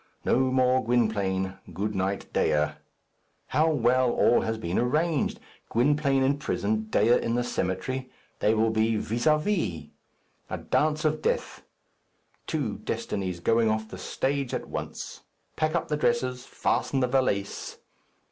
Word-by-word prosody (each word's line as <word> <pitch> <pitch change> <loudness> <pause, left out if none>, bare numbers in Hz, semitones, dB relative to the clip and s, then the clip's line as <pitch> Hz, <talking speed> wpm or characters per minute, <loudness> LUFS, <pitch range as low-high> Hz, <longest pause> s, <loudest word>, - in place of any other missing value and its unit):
No - - +3
more 130 0 +3
Gwynplaine. 100 -5 0
Good 100 +5 -2
night, 95 +1 -1
Dea. 75 0 +2 0.8
How 155 +4 +3
well 130 -2 +3
all 120 - +4
has 110 0 -2
been 90 -4 -1
arranged! 150 +5 +1 0.3
Gwynplaine 135 +2 +2
in 140 +2 +2
prison, 110 -6 -1
Dea 110 +2 +3
in 115 - -1
the 120 - +1
cemetery, 120 +5 -2 0.3
they 110 - +3
will 110 +1 +2
be 110 0 +2
vis 115 +4 -1
à 155 0 +5
vis! 150 - -2 0.6
A - - -3
dance 155 0 0
of 155 0 +1
death! - - -1 0.9
Two - - -2
destinies 95 -3 -3
going 115 +5 +3
off 110 0 -1
the - - -8
stage 135 -1 -1
at - - -4
once. - - -6 0.3
Pack 155 +1 0
up 170 - 0
the 150 - -1
dresses. 130 - 0
Fasten 135 - 0
the 125 - +2
valise. 125 -7 -1
120 Hz, 145 wpm, -27 LUFS, 105-140 Hz, 0.9 s, à